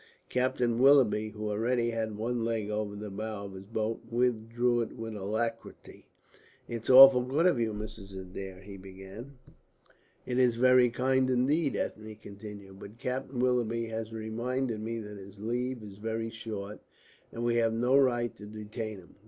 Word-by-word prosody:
Captain 125 -2 +1
Willoughby, 125 -6 +5
who 105 0 -4
already 120 +2 +1
had 110 -2 -3
one 115 +2 -1
leg 110 -2 -1
over 105 -1 -2
the 105 0 -6
bows 105 0 -5
of - - -12
his 95 0 -9
boat, 110 +1 -2
withdrew 120 0 +1
it 115 - -4
with 115 -2 -6
alacrity. 110 +3 -4 0.6
"It's 115 -1 -5
awfully 130 -1 +9
good 155 +6 +2
of 175 -9 +4
you, 115 -1 +1
Mrs. 105 -2 -7
Adair," 95 0 -8
he 100 0 -10
began. 95 +7 -11 0.9
"It 125 0 -1
is 125 -2 +4
very 125 0 +5
kind 130 +2 +1
indeed," 135 +4 +2
Ethne 110 0 -4
continued, 100 -2 -11
"but 105 +3 -11
Captain 130 +2 -4
Willoughby 120 -2 +1
has 110 0 -4
reminded 115 +2 -2
me 115 +1 -3
that 105 -2 -7
his 100 +1 -12
leave 120 +3 -3
is 100 -2 -10
very 115 +1 -3
short, 105 -3 -6 0.5
and 115 - -5
we 120 0 +2
have 115 -1 +3
no 120 +4 +2
right 120 -4 +3
to 105 - -10
detain 110 0 -6
him. 90 -2 -16
115 Hz, 165 wpm, -30 LUFS, 105-125 Hz, 0.9 s, awfully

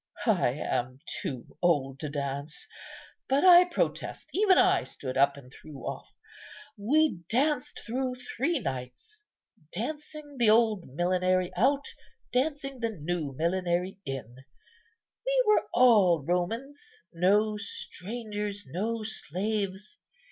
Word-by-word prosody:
I - - +3
am 125 +1 -2 0.2
too 130 -4 -6
old 140 -6 +1
to 150 - -4
dance; 140 +1 -4 0.6
but, 275 +6 +3
I 360 -1 +9
protest, 355 - -2
even 390 -1 +4
I 375 0 +4
stood 130 -2 -6
up 140 +1 +3
and 130 -2 -14
threw 145 -3 -11
off. - - -6 0.6
We 275 - +2
danced 290 +4 0
through 255 +2 -2
three 265 +6 -1
nights, 130 - -6 0.5
dancing 295 - -6
the 235 -3 +5
old 220 -4 +3
millenary 180 +4 +1
out, 275 +8 +2 0.5
dancing 275 0 -1
the 230 -1 0
new 165 -6 -3
millenary 180 +2 0
in. 125 -3 -6 0.9
We - - +2
were 425 - +3
all 205 - +5
Romans, 225 - -2 0.3
no 205 +5 +3
strangers, 205 0 -5
no 215 - -3
slaves. 205 - -3
205 Hz, 115 wpm, -28 LUFS, 165-265 Hz, 0.9 s, I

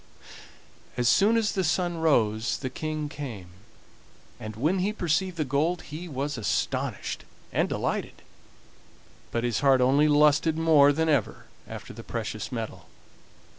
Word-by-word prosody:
As 120 -1 +1
soon 215 - +4
as 220 -2 +1
the 190 - -1
sun 175 +1 0
rose 115 -8 +2
the 130 -2 -5
King 155 +1 -3
came, 125 -11 -7 0.9
and 110 0 -7
when 155 - +1
he 195 +3 +1
perceived 185 -2 -1
the 155 - 0
gold 155 +6 0
he 160 +4 -8
was 140 -2 -3
astonished 110 - -2 0.3
and - - +1
delighted, - - -3 1.1
but 115 - -2
his 120 -2 0
heart 135 -2 +4
only 135 +4 +4
lusted 150 +2 +4
more 155 -3 +5
than 160 +3 0
ever 145 -3 0 0.2
after - - -8
the - - -9
precious - - -5
metal. - - -6
150 Hz, 140 wpm, -27 LUFS, 130-165 Hz, 1.1 s, more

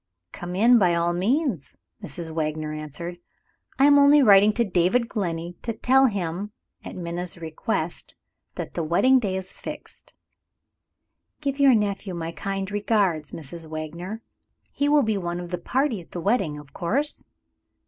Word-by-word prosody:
"Come 175 +1 -6
in 235 +5 +6
by 180 -4 +3
all 170 0 +1
means," 220 - -1 0.2
Mrs. 160 +3 -6
Wagner 155 -1 -2
answered. 155 +4 -6 0.6
"I 270 - +5
am 285 0 +7
only 285 0 +6
writing 205 -2 +7
to 235 +2 +1
David 190 +6 +2
Glenney, 175 -6 -4
to 230 - -3
tell 265 +4 +4
him 195 -1 -3 0.3
(at - - -8
Minna's 175 0 -4
request) 160 -2 -4 0.4
that - - -6
the - - -2
wedding 255 +12 +4
day 200 -5 -2
is 190 0 -5
fixed." - - -9 1.2
"Give 280 -1 -3
your 275 -3 +6
nephew 200 -3 -1
my 165 -1 -4
kind 195 +4 -4
regards, 200 -7 0
Mrs. 165 +1 -8
Wagner. 170 +7 -6 0.5
He 285 0 0
will 295 -1 +5
be 220 -2 0
one 175 -1 -3
of 175 0 -7
the 180 - -2
party 250 0 0
at 165 - -18
the 175 - -4
wedding, 175 -6 0
of 145 -2 -13
course?" 265 - -2
185 Hz, 160 wpm, -24 LUFS, 170-230 Hz, 1.2 s, am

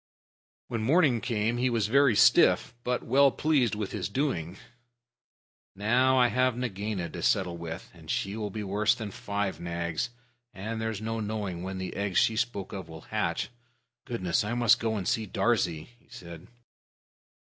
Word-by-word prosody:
When 115 -3 -3
morning 135 -1 +3
came 115 0 0
he 125 +1 +1
was 115 -3 +1
very 135 +1 +4
stiff, - - +5
but 125 0 -1
well 140 +3 +5
pleased 135 -6 +1
with 105 -2 -4
his 100 -3 -3
doings. 100 - -2 1.2
"Now 125 +6 +3
I 125 -1 +5
have 125 -1 +1
Nagaina 105 -6 -3
to - - -6
settle 90 -3 +1
with, 85 -1 -7
and - - -15
she 100 +2 -1
will 105 -2 -3
be 105 +2 -5
worse 105 +3 +2
than 110 -3 -6
five 100 0 -3
Nags, 85 +5 -3 0.5
and 110 +4 -4
there's 110 -2 -3
no 115 +1 -3
knowing 105 -5 -3
when 95 +1 -5
the 95 -1 -5
eggs 100 -2 -1
she 110 - +4
spoke 110 -4 -2
of 95 -3 -6
will 80 -1 -9
hatch. - - -2 0.6
Goodness! 95 -8 0
I 110 +3 -2
must 120 -2 +4
go 110 -1 -1
and 100 -4 -3
see 110 -2 0
Darzee," 90 -6 0
he - - -30
said. 85 -1 -10
110 Hz, 170 wpm, -28 LUFS, 95-120 Hz, 1.2 s, stiff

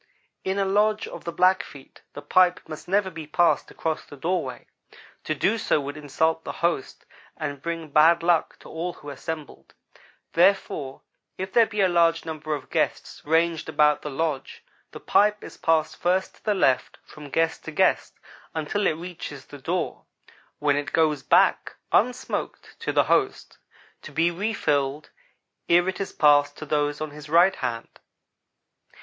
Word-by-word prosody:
In 190 +1 -1
a 200 - +1
lodge 210 +2 +1
of - - -10
the 170 - -3
Blackfeet 180 -6 0
the 145 - -9
pipe 180 -1 +3
must 155 -1 -9
never 190 +1 +1
be 160 -3 -8
passed 170 +3 +2
across 160 -1 -3
the 145 - -13
doorway. 160 -4 -2 0.6
To 155 - -1
do 215 +9 +1
so - - +1
would 140 +1 -5
insult 160 +2 -1
the - - -5
host 170 -6 -2 0.3
and 145 -3 -5
bring 165 -1 -4
bad 165 +3 +5
luck 170 -2 +1
to - - -13
all 170 +2 -4
who 145 -1 -10
assembled. 155 +2 -8 0.6
Therefore 170 -7 +1 0.4
if 190 +1 -5
there 230 -2 +5
be 210 -2 -2
a 190 - +5
large 170 -2 +2
number 155 -1 -3
of 140 - -10
guests - - -1
ranged 165 +1 +1
about 150 -1 +3
the 150 - -5
lodge, 150 0 -3 0.3
the - - -9
pipe 210 0 +2
is - - -10
passed 160 -1 +1
first 185 +2 0
to - - -28
the 210 -1 +2
left 135 -9 +1
from 150 -1 -12
guest 165 +2 0
to - - -5
guest - - +1 0.4
until 160 +6 0
it 155 - 0
reaches 175 0 -8
the - - -12
door, - - -3 0.5
when 145 -1 +1
it 145 0 -4
goes 155 -3 +2
back, - - +3 0.2
unsmoked, 250 +3 -1
to - - -2
the - - +3
host, - - 0 0.4
to - - -10
be 165 +2 +2
refilled 150 -8 -1 0.6
ere 175 +1 +5
it 190 +1 -2
is 195 - -4
passed 145 -1 +4
to 155 - -7
those 145 0 -1
on 155 -1 -4
his 150 0 -11
right 175 +4 +5
hand. 115 -1 -5
160 Hz, 165 wpm, -25 LUFS, 150-180 Hz, 0.6 s, bad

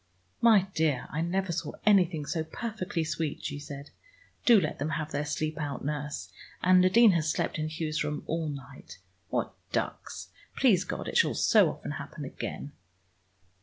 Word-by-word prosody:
"My 220 -5 +6
dear, 150 -5 +1
I 150 - -1
never 185 +2 0
saw 165 -2 -3
anything 180 -7 +4
so 160 +2 -1
perfectly 190 -1 -3
sweet," 160 0 -3
she 145 - -3
said. 145 0 -9 0.6
"Do 235 -4 +8
let 155 -5 -3
them 145 +3 -1
have 155 -1 -4
their 145 +1 -1
sleep 155 +1 -2
out, 140 -3 -4
nurse. 145 -11 -4 0.3
And 185 0 +6
Nadine 210 +5 +6
has 160 -3 +1
slept 155 - -1
in 155 0 -1
Hugh's 155 -1 -2
room 150 0 -3
all 165 -1 -2
night. 135 -2 -9 0.3
What - - -1 0.2
ducks! - - -3 0.3
Please - - +4
God - - -4
it - - 0
shall - - +3
so - - +5
often - - -6
happen - - -6
again!" 145 - -6
155 Hz, 165 wpm, -29 LUFS, 145-180 Hz, 0.6 s, Do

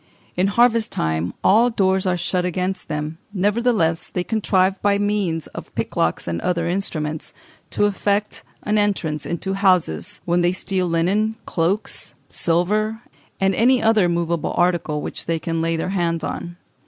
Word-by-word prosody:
In 185 +2 +2
harvest 230 +1 +3
time 80 +2 -1
all 225 +5 +5
doors 190 -4 +1
are 180 -1 +1
shut 180 +1 0
against 180 +2 -2
them; 150 +2 -4 0.2
nevertheless 200 -4 +1
they 180 - -2
contrive, 195 -3 +1
by 200 0 +3
means 200 -6 0
of - - -9
picklocks 80 - -1
and 85 -1 -2
other 170 -2 0
instruments, 155 -4 -3 0.3
to 205 - +1
effect 205 +1 0 0.2
an 210 0 +1
entrance 170 -8 -1
into 180 +3 -2
houses, 185 - +1
when 175 0 +2
they 175 +1 +2
steal 185 -1 -1
linen, 195 +7 +1
cloaks, 180 +6 -1
silver, 210 +7 0 0.4
and 195 0 +2
any 245 +6 +4
other 220 -5 +3
movable 170 -1 -1
article 170 -4 +1
which - - -6
they 165 0 +1
can 165 0 -2
lay 165 0 0
their 165 +3 -2
hands 170 -4 0
on. 175 0 -5
185 Hz, 155 wpm, -21 LUFS, 165-205 Hz, 0.4 s, all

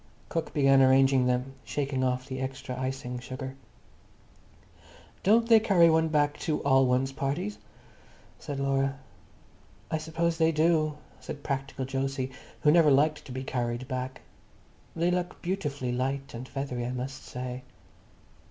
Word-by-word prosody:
Cook 165 - -2
began 135 -2 +5
arranging 135 -1 +5
them, 125 +2 0
shaking 135 -2 -2
off 130 0 -1
the 130 -1 -5
extra 130 -1 -4
icing 130 -1 -4
sugar. 130 +1 -6 1.7
"Don't 230 +4 +4
they 225 -1 +7
carry 175 -6 +5
one 160 0 +3
back 150 -1 +1
to 155 - -1
all 135 -1 +4
one's 130 +2 +1
parties?" 155 +9 -3 0.8
said 140 -1 -5
Laura. 135 0 +1 0.9
"I 160 - 0
suppose 165 +1 -1
they 160 0 +4
do," 155 -1 +2 0.2
said 145 - -8
practical 135 -1 -3
Jose, 135 0 -2 0.3
who 150 - +5
never 165 -2 +6
liked 150 +2 +3
to 135 - -9
be 130 +1 -4
carried 120 -1 -2
back. 130 -1 -4 0.7
"They 170 +2 +1
look 180 0 -2
beautifully 145 -9 -2
light 135 +2 -2
and 120 +2 -7
feathery, 135 -3 -3
I 125 - -3
must 130 +2 -5
say." 125 0 -6
135 Hz, 145 wpm, -28 LUFS, 130-155 Hz, 1.7 s, they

